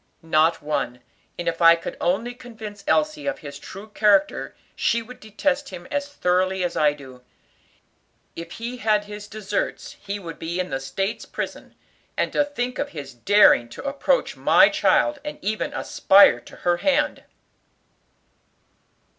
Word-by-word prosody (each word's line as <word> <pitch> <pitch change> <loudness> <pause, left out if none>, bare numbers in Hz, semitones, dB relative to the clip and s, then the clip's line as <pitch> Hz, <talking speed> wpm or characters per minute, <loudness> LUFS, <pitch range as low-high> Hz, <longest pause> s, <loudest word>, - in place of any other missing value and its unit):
"Not 160 0 +2
one; 140 -5 -2 0.4
and 175 - -5
if 165 +1 -2
I 165 0 +8
could 165 - -7
only 210 +8 0
convince 220 -5 -10
Elsie 305 -1 +1
of 280 - -1
his 140 0 -8
true 195 +3 -10
character 205 -2 +2 0.2
she 235 0 +1
would 250 +2 -12
detest 275 +7 -2
him 175 -2 -9
as 285 -1 -1
thoroughly 185 -6 0
as 175 - -2
I 150 -1 +4
do. 130 -3 -13 1.1
If 170 0 -8
he 240 +2 -6
had 215 -3 +2
his 210 0 -9
deserts, 215 - -4
he 200 +1 -4
would 170 -5 -9
be 170 +2 -4
in 180 -5 -2
the 135 - -1
State's 195 +10 -3
Prison; - - -6 0.4
and - - 0
to 290 - +3
think 250 -3 -4
of 285 - -2
his 145 -6 -8
daring 120 - +5
to 115 - -9
approach 285 - 0
my - - +5
child, 300 -1 +2
and 295 0 -6
even 215 +1 -2
aspire 195 -11 +5
to - - -15
her 175 0 0
hand!" 295 +7 +1
205 Hz, 155 wpm, -23 LUFS, 170-250 Hz, 1.1 s, I